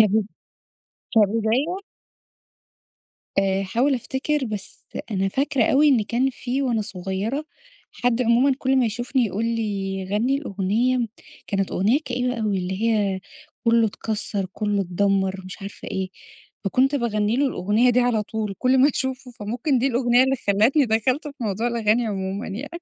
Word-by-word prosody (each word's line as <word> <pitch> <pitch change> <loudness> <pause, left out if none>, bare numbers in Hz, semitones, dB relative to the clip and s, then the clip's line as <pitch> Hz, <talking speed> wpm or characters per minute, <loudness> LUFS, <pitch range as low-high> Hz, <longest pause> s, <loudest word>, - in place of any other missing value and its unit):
كب 215 -1 +4 0.9
كبداية؟ 225 - +2 1.6
آآ 195 0 +2
هاحاول 240 +9 +1
أفتكر، 265 +3 -1
بس 210 -4 -6 0.3
أنا 195 -1 0
فاكرة 270 +2 +1
أوي، 295 +6 +4
إن 255 -6 +4
كان 245 +4 +1
في 260 +2 -2
وأنا 235 -4 +1
صغيرة 200 +7 -3 0.5
حد 245 0 +1
عمومًا 245 +4 +4
كل 265 0 +1
ما 260 - +4
يشوفني، 240 +3 0
يقول 210 +3 -2
لي 200 -4 -2
غَنّي 245 +6 +2
الأغنية، 230 +2 0 0.4
كانت 195 -1 -1
أغنية 215 +9 +2
كئيبة 250 0 -1
أوي 210 -3 0
اللي 185 +3 -3
هي، 205 -4 +1 0.4
كُلّه 230 -1 +4
اتكسّر، 205 -2 -3
كُلّه 205 -1 0
اتدمّر 190 +1 0
مش 185 +2 -9
عارفة 200 - -8
إيه. 190 -1 -2 0.6
فكنت 260 +8 +2
باغنّيله 235 +1 +1
الأغنية 220 +2 +2
دي 245 +1 +3
على 245 -3 +2
طول 210 -1 -4
كل 260 +1 +3
ما 270 +3 +6
أشوفه 265 -1 -3
فممكن 240 +5 -1
دي 255 - +1
الأغنية 245 -1 +3
اللي 265 0 +1
خلّتني 220 +9 +4
دخلت 250 +6 0
في 285 - -10
موضوع 215 +3 -1
الأغاني 230 0 +1
عمومًا 195 0 -3
يع 230 +9 -5
225 Hz, 145 wpm, -23 LUFS, 200-255 Hz, 1.6 s, ما